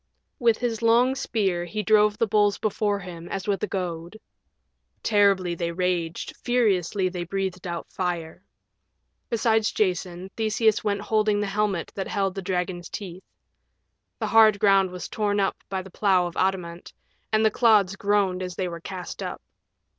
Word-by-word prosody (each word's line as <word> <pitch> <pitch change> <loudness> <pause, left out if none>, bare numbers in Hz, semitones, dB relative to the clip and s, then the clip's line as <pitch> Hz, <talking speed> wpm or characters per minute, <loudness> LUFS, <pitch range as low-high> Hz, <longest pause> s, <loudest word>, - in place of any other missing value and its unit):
With 230 -2 +3
his 235 -2 -2
long 235 +3 +4
spear 195 -9 -1
he 210 +5 -4
drove 210 -1 +4
the 230 - +2
bulls 205 -1 +2
before 210 -1 0
him 175 -3 -9
as 195 0 -4
with 200 -3 0
a 210 - -1
goad. 175 +1 -4 0.8
Terribly 200 -4 +3
they 170 0 -2
raged, 175 -2 -2
furiously 200 -6 +1
they 180 -1 -4
breathed 185 0 -3
out 170 -1 -5
fire. 175 -1 -4 0.9
Beside 225 -1 +2
Jason 185 -3 -1
Theseus 220 0 +1
went 200 -1 -1
holding 215 -1 +1
the 205 - 0
helmet 200 -3 -1
that 195 - -4
held 195 -2 -1
the 195 - -5
dragon's 180 -1 -3
teeth. 185 -3 -7 1.0
The - - -2
hard 220 -2 +6
ground 195 -2 +4
was 180 0 -7
torn 205 -1 -1
up 195 - 0
by 190 -1 -3
the 190 - -13
plow 190 -2 +2
of 175 0 -6
adamant, 180 -3 -2 0.4
and 215 0 +3
the 220 - +4
clods 210 -5 +4
groaned 200 -2 +1
as 180 -1 -5
they 185 - -2
were 170 -1 -7
cast 180 -1 -7
up. - - -5
195 Hz, 160 wpm, -25 LUFS, 180-210 Hz, 1.0 s, hard